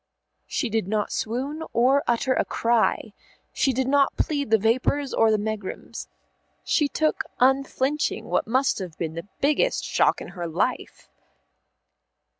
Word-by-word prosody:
She 260 - -1
did 220 -4 -1
not 210 0 -1
swoon 265 +8 -3
or 260 +4 +4
utter 240 +2 +2
a - - +1
cry. 230 -2 0 0.4
She 270 - +2
did 260 +1 -1
not 280 0 +3
plead 285 -5 -1
the 220 - +5
vapours 255 +6 +1
or 225 - +4
the 215 - +3
megrims. 210 -2 -5 0.6
She 295 - +2
took 310 +2 0 0.2
unflinching 270 +3 +1
what - - 0
must 260 +2 +1
have 180 -5 -7
been 160 -2 -3
the 170 +4 -7
biggest 300 - +2
shock - - +2
in - - -8
her 175 -2 -5
life. 180 +10 -2
245 Hz, 145 wpm, -24 LUFS, 215-275 Hz, 0.6 s, the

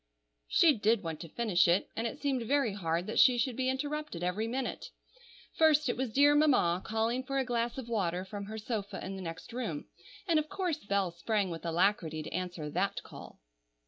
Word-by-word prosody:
She 320 -3 +5
did 220 -2 +2
want 160 -2 -4
to 165 - -8
finish 200 -4 +2
it, 175 +3 +2
and 230 +1 -1
it 230 - -6
seemed 275 -3 0
very 265 -2 +1
hard 170 -3 -1
that 215 - -1
she 250 -2 +7
should 240 +1 0
be 260 +1 0
interrupted 290 - -3
every 190 +5 -1
minute. 255 +2 -3 0.7
First 305 -3 +4
it - - 0
was 255 -2 -2
dear 285 +5 +5
Mamma 255 - +3
calling 225 +4 -1
for 275 +1 -3
a 265 - +1
glass 235 0 -1
of 260 -3 -5
water 185 -5 -1
from 200 +1 -6
her 220 +2 -7
sofa 210 -3 -4
in 195 - -5
the 190 - -6
next 165 +5 -7
room, 220 -12 -3 0.4
and 330 -3 +4
of 310 0 -4
course 365 -6 -2
Bell 200 -3 +1
sprang 190 +2 -1
with 165 - -6
alacrity 165 -2 +1
to - - -8
answer 175 -3 -3
that 195 +4 -1
call. - - -12
220 Hz, 205 wpm, -31 LUFS, 180-260 Hz, 0.7 s, she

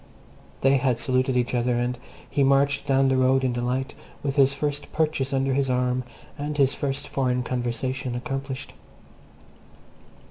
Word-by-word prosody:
They 135 +1 +4
had 130 -3 +1
saluted 130 +1 +1
each 125 0 0
other, 120 0 +1
and 120 0 -1 0.3
he 140 - +1
marched 140 +1 +2
down 135 -1 +4
the 130 0 +2
road 130 +1 +3
in 130 -2 +1
delight, 125 +2 -2 0.3
with 140 -1 -1
his 140 -1 +4
first 145 0 -3
purchase 150 -4 0
under 135 0 +1
his 135 0 +1
arm 125 0 +1 0.4
and 145 +1 -3
his 135 -2 +3
first 135 -1 -3
foreign 125 -2 0
conversation 125 +1 -2
accomplished. 135 0 -4
130 Hz, 150 wpm, -25 LUFS, 125-140 Hz, 0.4 s, They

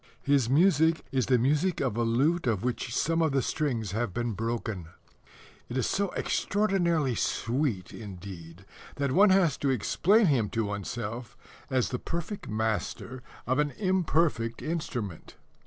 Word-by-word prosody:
His 140 -4 +2
music 160 +1 +4
is 130 -3 +1
the 130 - +4
music 150 +9 +1
of 130 -6 0
a 120 - 0
lute 135 +8 +2
of 110 -3 0
which 125 -1 -2
some 165 +6 +1
of 160 -4 +2
the 135 - +3
strings 120 - -1
have 110 -2 -2
been 120 -1 -1
broken. 110 -5 -3 0.8
It 125 - -3
is 130 - +1
so 200 -1 0
extraordinarily 175 -9 +1
sweet, 115 - -1
indeed, 95 -4 -9 0.3
that 140 -2 -1
one 200 +8 +6
has 185 -7 +4
to 140 - 0
explain 190 - +3
him 125 - +2
to 115 - +2
oneself 110 +3 -5 0.3
as 130 -2 +1
the 125 - -3
perfect 170 +5 -5
master 110 +3 -2 0.2
of 130 +3 +1
an 150 0 +2
imperfect 165 - +1
instrument. 125 - -4
130 Hz, 150 wpm, -28 LUFS, 115-160 Hz, 0.8 s, one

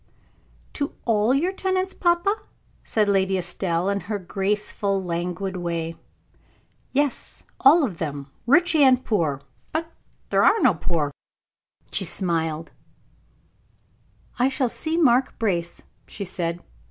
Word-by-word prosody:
"To 285 -1 -3
all 220 0 +3
your 305 +8 +2
tenants, 375 0 -1
papa?" 345 +3 +2 0.5
said 215 -2 +1
Lady 190 -1 +2
Estelle, 180 -1 -1
in 200 0 +1
her 210 +1 -3
graceful, 195 +1 -1
languid 180 +2 -3
way. 170 -2 -2 1.0
"Yes, 285 -1 -1 0.2
all 300 +5 +7
of 195 -11 -3
them 145 -3 -4 0.2
rich 335 +7 +5
and 260 -4 +5
poor; 155 - 0 0.3
but 315 +1 0
then 330 - -25 0.4
there - - +3
are 450 - +5
no 250 - +5
poor." 155 -2 -1 0.8
She - - +1
smiled. 165 -3 -1 1.7
"I 255 +2 +4
shall 260 -2 0
see 320 +7 -2
Mark 260 -5 +3
Brace," 175 -7 -2 0.2
she 200 - -6
said. 175 -2 -3
200 Hz, 125 wpm, -24 LUFS, 170-270 Hz, 1.7 s, all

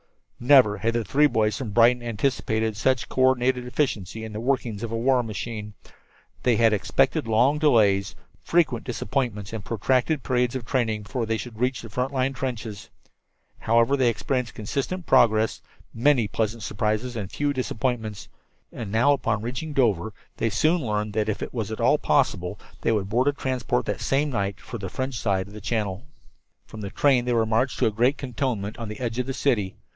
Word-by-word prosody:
Never 125 -6 +6
had 115 +4 0
the 120 - +1
three 150 +6 +3
boys 110 -5 +1
from 125 -2 -4
Brighton 120 +3 +4
anticipated 110 -2 -1
such 125 +3 +1
co 130 - -2
ordinated 130 -1 +2
efficiency 110 - -2
in 110 -1 -7
the 105 - -4
workings 120 -4 -1
of 115 -2 -4
a 115 - -1
war 125 +2 +3
machine. 110 -1 -6 0.7
They 125 -2 +3
had 115 -1 +4
expected 105 +2 +1
long 125 +7 +3
delays, 105 -10 +3 0.3
frequent 150 -9 +1
disappointments 115 -3 -3
and 110 -3 -5
protracted 130 - 0
periods 125 -1 0
of 125 -3 -4
training 110 -4 -1
before 115 +2 -3
they 115 0 0
should 110 -1 -8
reach 125 0 0
the 115 - -10
front 125 +4 -1
line 135 0 0
trenches. 120 -6 -5 0.8
Instead, 115 +5 +3
they 125 -2 +4
experienced 125 +1 -2
consistent 140 - -3
progress, 110 -5 +3 0.3
many 120 -1 +3
pleasant 110 +2 -2
surprises 110 +3 -2
and 100 -4 -5
few 145 -1 -1
disappointments; 120 -4 -3 0.5
and 110 -4 -6
now, 120 +6 +4
upon 115 -5 -1
reaching 130 +6 -4
Dover, 110 -7 +1 0.3
they 115 - 0
soon 160 - +2
learned 105 -2 -2
that 110 0 0
if 105 - -2
it - - -7
was 110 -4 -3
at 110 - -5
all 135 +5 +3
possible 100 -12 0 0.2
they - - +1
would 100 -3 -1
board 125 +5 +2
a - - +5
transport 130 -3 -1
that - - -3
same 145 +2 +1
night 100 -5 -2
for 120 - -8
the 95 -2 -5
French 130 +3 -3
side 95 -3 0
of 100 - -14
the 105 - -9
channel. 105 -3 -2 0.6
From 110 - -10
the 100 - -4
train 130 +1 +2
they 125 - 0
were 115 -1 +2
marched 115 +4 0
to - - +2
a 110 - +2
great 120 +6 +2
cantonment 120 -5 -3
on 115 - -5
the 105 - -7
edge 120 -1 -3
of 125 - -1
the 135 - -2
city. 105 -11 0
115 Hz, 190 wpm, -25 LUFS, 110-130 Hz, 0.8 s, Never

